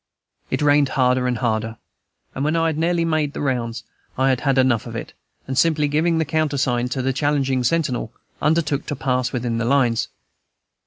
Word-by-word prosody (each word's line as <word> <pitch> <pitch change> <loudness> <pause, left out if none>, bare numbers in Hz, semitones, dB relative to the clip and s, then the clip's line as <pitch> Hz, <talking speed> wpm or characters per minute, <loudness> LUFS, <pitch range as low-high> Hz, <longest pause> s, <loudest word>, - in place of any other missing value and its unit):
It - - -1
rained 145 -1 +4
harder 125 -1 +2
and 125 -1 0
harder, 110 -1 -1 0.6
and 135 - -3
when 155 +2 +1
I 165 0 +2
had 160 -2 0
nearly 170 0 +1
made 155 -3 0
the - - -6
rounds 120 -4 -2 0.3
I 130 +1 +3
had 130 -1 +1
had 135 -2 +1
enough 130 -4 +2
of - - -7
it, - - -6 0.3
and, 130 - -4
simply 150 +1 +3
giving 160 +3 +1
the 160 - +1
countersign 135 -5 0
to 130 0 -2
the 135 0 0
challenging 135 -2 0
sentinel, 130 -5 0 0.3
undertook 150 -2 +1
to 145 - -2
pass 130 -1 -1
within 120 -2 -2
the 115 - -1
lines. 120 -3 +2
135 Hz, 190 wpm, -21 LUFS, 125-150 Hz, 0.6 s, rained